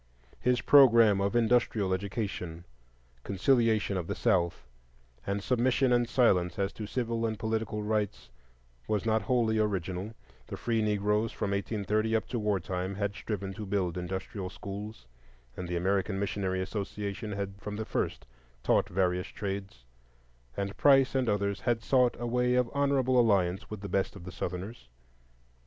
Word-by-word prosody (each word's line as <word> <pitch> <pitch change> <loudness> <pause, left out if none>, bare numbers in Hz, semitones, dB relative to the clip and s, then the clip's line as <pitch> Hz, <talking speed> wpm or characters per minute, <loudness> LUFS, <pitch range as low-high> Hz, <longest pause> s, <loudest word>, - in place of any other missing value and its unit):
His 125 -1 +1
programme 115 -8 +6
of 100 +4 0
industrial 115 -4 +2
education, 95 -4 -4 0.6
conciliation 110 -1 +2
of 85 -2 -3
the - - -2
South, 85 - +1 0.6
and 100 0 -1
submission 125 +1 +2
and 120 -1 +2
silence 90 -9 +3
as 100 0 -1
to 105 - -6
civil 115 -1 -2
and 110 -1 -1
political 110 -1 -2
rights, 105 - -2 0.6
was 105 0 0
not 110 -1 +2
wholly 115 -3 +1
original; 95 0 -2 0.3
the - - -6
Free 115 -2 0
Negroes 105 +1 +1
from 100 - -3
1830 105 +2 0
up 110 - 0
to 120 - -2
war 105 -2 +1
time 90 +2 -3
had 100 0 -1
striven 100 -3 -4
to 105 +2 -7
build 95 -3 -1
industrial 95 +1 -4
schools, 100 - -8 0.5
and 90 - -5
the 90 - -3
American 95 +2 0
Missionary 95 -2 -1
Association 105 +1 -4
had 100 0 -5
from 105 0 -5
the 110 +1 -4
first 65 - -2 0.4
taught - - +2
various 90 0 0
trades; 95 - -6 0.7
and 100 0 -3
Price 135 -2 +5
and 130 -3 +1
others 100 -1 0
had 120 -2 0
sought 125 -2 +3
a 120 - -3
way 125 +1 +1
of 125 -2 +1
honorable 135 -3 +2
alliance 95 -6 +2
with 105 -2 -7
the 100 - -5
best 95 +1 -1
of 100 - -10
the 95 - -8
Southerners. 90 - -6
105 Hz, 155 wpm, -30 LUFS, 95-115 Hz, 0.7 s, programme